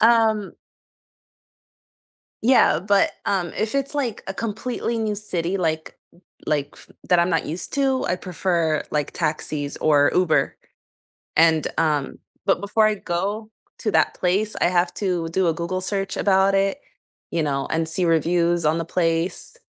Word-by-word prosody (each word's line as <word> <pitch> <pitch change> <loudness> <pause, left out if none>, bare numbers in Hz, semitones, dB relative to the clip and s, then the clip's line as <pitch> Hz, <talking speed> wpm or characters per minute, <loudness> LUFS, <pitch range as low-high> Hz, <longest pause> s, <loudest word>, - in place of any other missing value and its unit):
Um 220 -3 +3 1.9
Yeah, 235 -10 +5
but, 200 +2 +2
um, 185 -4 0
if 220 +3 -2
it's 275 +1 -1
like 245 -7 -2
a 195 - -3
completely 230 +2 -3
new 215 -2 -1
city, 190 -3 -2
like 160 -3 -2 0.5
like 145 -1 -1 0.3
that 180 - +4
I'm 170 +1 +3
not 165 -2 0
used 165 +4 -5
to, 270 -2 +1
I - - +1
prefer, 170 -3 0
like, 150 -1 0
taxis 150 -3 -2
or 145 -2 +4
Uber, 180 -3 +2 0.8
and 160 -1 +4
um 150 -4 0 0.3
but 195 - +2
before 210 +2 +2
I 215 0 +1
go 200 +4 -3 0.3
to 215 - -1
that - - +3
place, 195 +4 0
I - - +3
have 175 0 +2
to 180 -5 -1
do 185 +2 +1
a 165 - +1
Google 170 +3 -3
search 195 +1 -2
about 195 0 +3
it, 195 +7 +1 0.5
you 165 - 0
know, 140 -2 -1
and 160 0 0
see 180 +3 0
reviews 170 +1 +2
on 155 +2 +2
the 165 - -2
place, 165 +1 -1
180 Hz, 150 wpm, -23 LUFS, 165-205 Hz, 1.9 s, Yeah